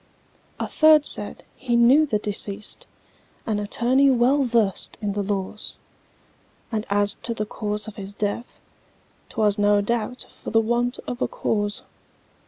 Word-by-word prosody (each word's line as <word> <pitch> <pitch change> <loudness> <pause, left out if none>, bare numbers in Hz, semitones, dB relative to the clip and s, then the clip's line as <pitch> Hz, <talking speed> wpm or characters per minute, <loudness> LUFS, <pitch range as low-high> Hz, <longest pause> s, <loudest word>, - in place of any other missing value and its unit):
A - - -1
third 310 -1 +5
said, - - +3
"He 245 -2 -2
knew 260 +6 +5
the 215 - +1
deceased, 205 0 -5 0.6
An 215 -2 -1
attorney 250 +6 +2
well 265 +2 +3
versed 225 -5 0
in 205 -2 -2
the 205 - -2
laws, 200 +1 -4 0.9
And 220 -2 -3
as 205 0 +3
to 230 - -1
the 215 - -2
cause 210 0 -4
of 215 - -9
his 200 0 -8
death, 210 +4 -4 0.7
'Twas 210 -2 +1
no 205 0 +4
doubt 235 +3 -2
for - - -9
the 225 - +3
want 240 +2 0
of 245 +1 -6
a - - +2
cause." 205 -1 -2
215 Hz, 150 wpm, -23 LUFS, 205-240 Hz, 0.9 s, third